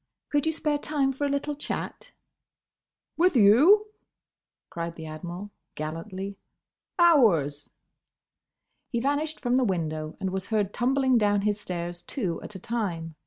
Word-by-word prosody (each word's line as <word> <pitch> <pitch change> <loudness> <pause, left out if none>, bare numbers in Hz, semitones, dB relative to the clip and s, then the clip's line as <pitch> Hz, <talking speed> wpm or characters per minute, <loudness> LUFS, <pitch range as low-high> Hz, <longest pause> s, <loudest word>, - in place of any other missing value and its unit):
Could 290 +1 +1
you - - +3
spare 300 -2 -1
time 285 -3 0
for 270 +2 -2
a - - 0
little 280 +1 -1
chat?" 295 - -5 1.1
"With 355 -1 +3
you?" 270 - +6 0.9
cried 170 0 -4
the 160 - -8
Admiral, 175 +6 -7 0.2
gallantly. 185 +6 -5 0.6
"Hours!" 195 - +4 1.2
He 235 - -1
vanished 290 +4 -1
from 245 -1 +1
the 260 - +3
window 155 -6 -2
and 190 -1 -2
was 190 0 -3
heard 210 -3 0
tumbling 260 0 +2
down 205 -1 +2
his 210 0 0
stairs 175 -1 -5
two 190 -12 -3
at 210 - -9
a - - -6
time. 185 -8 -3
210 Hz, 140 wpm, -27 LUFS, 175-280 Hz, 1.2 s, you